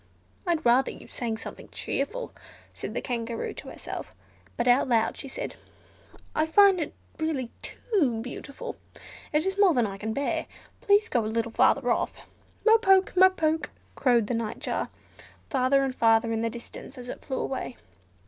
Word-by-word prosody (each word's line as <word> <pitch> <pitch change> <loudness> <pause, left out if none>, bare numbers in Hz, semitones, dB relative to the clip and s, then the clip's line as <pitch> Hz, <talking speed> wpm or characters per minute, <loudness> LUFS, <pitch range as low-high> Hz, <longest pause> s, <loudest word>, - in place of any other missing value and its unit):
"I'd 335 -2 +1
rather 245 +3 +5
you - - -10
sang 230 -2 -3
something - - -9
cheerful," 475 - -3 0.4
said - - -6
the - - -2
Kangaroo 235 -2 -3
to - - -10
herself, - - -7 0.4
but 235 - 0
out 250 +2 +4
loud 225 -2 +2
she - - -7
said, - - -6 0.8
"I 310 +1 +2
find 390 +1 +6
it 300 - -4 0.2
really 295 -7 -1
too 295 - 0
beautiful, 270 +3 -7 0.5
it 305 +3 +2
is 385 +1 -1
more 380 -6 +6
than 240 -2 +3
I 195 -1 -5
can 220 +2 -3
bear. 280 +5 -1 0.3
Please 410 +2 +4
go 240 - +1
a - - -2
little 230 +1 -1
further 245 +2 +3
off." - - 0 0.5
"Mo 450 0 +7
poke! 385 -3 +4
mo 375 +1 +8
poke!!" 320 -3 0 0.2
croaked 240 -4 +3
the 225 - -2
Nightjar, 230 -2 -2 0.6
further 275 0 +3
and 265 -1 -1
further 225 -1 +3
in 225 - 0
the 230 - 0
distance, 240 +3 -9
as 250 -1 -8
it - - -7
flew 265 - -3
away. 260 -2 -3
260 Hz, 170 wpm, -27 LUFS, 230-320 Hz, 0.8 s, mo